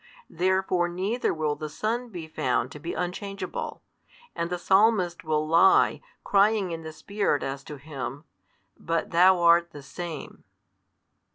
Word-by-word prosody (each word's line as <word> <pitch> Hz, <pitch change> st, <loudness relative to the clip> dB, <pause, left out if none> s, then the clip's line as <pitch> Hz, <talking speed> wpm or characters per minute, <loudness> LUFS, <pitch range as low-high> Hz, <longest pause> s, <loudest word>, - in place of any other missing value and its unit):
Therefore 185 Hz, 0 st, +1 dB
neither 195 Hz, +8 st, -1 dB
will 155 Hz, -2 st, -1 dB
the 155 Hz, +1 st, -6 dB
Son 230 Hz, +9 st, -2 dB
be 175 Hz, -6 st, -7 dB
found 130 Hz, -4 st, -1 dB
to 150 Hz, -, -9 dB
be 170 Hz, +4 st, -5 dB
unchangeable, 190 Hz, +1 st, -5 dB, 0.5 s
and 170 Hz, -, -2 dB
the 180 Hz, -, -2 dB
Psalmist 190 Hz, -1 st, +2 dB
will 155 Hz, -1 st, 0 dB
lie 170 Hz, +4 st, +5 dB, 0.2 s
crying 200 Hz, -2 st, +3 dB
in 165 Hz, -1 st, -5 dB
the 160 Hz, 0 st, -7 dB
Spirit 200 Hz, -1 st, -1 dB
as 135 Hz, +1 st, -4 dB
to 150 Hz, -, -7 dB
Him, 140 Hz, -1 st, -6 dB, 0.5 s
But 165 Hz, 0 st, -2 dB
Thou 180 Hz, +2 st, +6 dB
art 170 Hz, 0 st, +5 dB
the 145 Hz, -, -10 dB
Same. 165 Hz, +1 st, -7 dB
175 Hz, 145 wpm, -26 LUFS, 155-190 Hz, 0.5 s, Thou